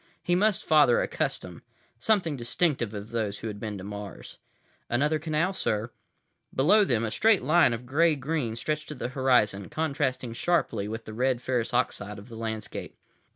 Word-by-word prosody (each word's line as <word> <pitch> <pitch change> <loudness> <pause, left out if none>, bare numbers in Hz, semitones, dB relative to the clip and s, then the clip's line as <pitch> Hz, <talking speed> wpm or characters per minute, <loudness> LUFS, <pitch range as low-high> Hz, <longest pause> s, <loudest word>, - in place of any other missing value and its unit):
He 175 - +1
must 200 +2 +2
father 150 -6 +5
a - - 0
custom, - - -3 0.4
something 180 - +2
distinctive 125 -1 0
of 105 +1 -7
those 110 -3 -2
who - - -6
had 105 -1 -7
been 105 -2 -4
to 95 - -8
Mars— 105 0 -8 0.5
"Another 150 +6 +2
canal, 160 +4 0
sir." 110 - -1 0.6
Below 205 +11 +5
them, 115 - +1
a 110 - -3
straight 220 - +3
line 155 0 +5
of 115 +1 -4
gray 155 +5 +3
green 135 -4 -2
stretched 150 +6 -3
to 150 - -6
the 125 - -4
horizon, 125 -7 +2
contrasting 135 -6 -1
sharply 155 - 0
with 110 +2 -6
the 110 - -8
red 125 +2 +1
ferrous 125 -2 -1
oxide 105 -4 -1
of 100 +4 -12
the 115 - -9
landscape. 110 -1 -5
125 Hz, 175 wpm, -27 LUFS, 110-155 Hz, 0.6 s, father